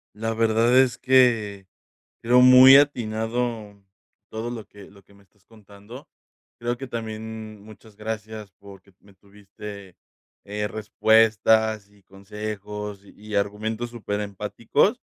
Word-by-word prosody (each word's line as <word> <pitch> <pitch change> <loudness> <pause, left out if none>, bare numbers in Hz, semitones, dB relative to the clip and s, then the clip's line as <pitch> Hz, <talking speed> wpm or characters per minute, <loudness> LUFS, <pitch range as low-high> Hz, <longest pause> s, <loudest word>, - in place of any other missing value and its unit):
La 115 +1 -3
verdad 115 +2 +2
es 130 -3 +2
que 115 -7 +2 0.6
creo 125 +2 +4
muy 130 +1 +9
atinado 115 -5 -1 0.5
todo 110 +2 -5
lo 115 -3 -7
que 100 -1 -15
lo 100 0 -20
que 100 - -24
me 100 - -22
estás 100 +1 -32
contando. 105 +3 -15 0.5
Creo 120 +1 -3
que 135 - -7
también, 110 -2 -7
mm, - - -18
muchas 110 0 -16
gracias, 110 -1 -7
porque 100 0 -16
me 100 0 -21
tuviste, 100 -1 -12 0.5
eh, 105 +1 -4
respuestas, 110 0 +2
y 105 -1 -25
consejos, 105 +1 -8
y 105 +1 -10
argumentos 110 +4 -3
super 105 -3 -5
empáticos. 100 -2 -1
110 Hz, 125 wpm, -23 LUFS, 100-115 Hz, 0.6 s, muy